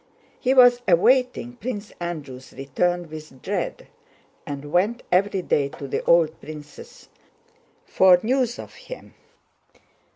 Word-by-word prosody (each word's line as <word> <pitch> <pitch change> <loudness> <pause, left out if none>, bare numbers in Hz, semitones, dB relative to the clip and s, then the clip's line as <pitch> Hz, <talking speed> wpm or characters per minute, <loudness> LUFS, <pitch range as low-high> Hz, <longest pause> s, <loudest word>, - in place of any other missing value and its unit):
He 260 +1 +1
was 245 -1 +7
awaiting 245 +6 +2
Prince 220 -4 -6
Andrew's 145 -7 -7
return 175 +6 -1
with 155 -4 -11
dread - - -3 0.6
and 145 0 -6
went 205 +8 +1
every 190 +1 +2
day 140 -4 +1
to 140 - -7
the - - -3
old 165 -2 +3
prince's 150 -1 -11 0.8
for 185 -1 +5
news 245 0 0
of - - -10
him. - - -11
175 Hz, 120 wpm, -23 LUFS, 150-240 Hz, 0.8 s, was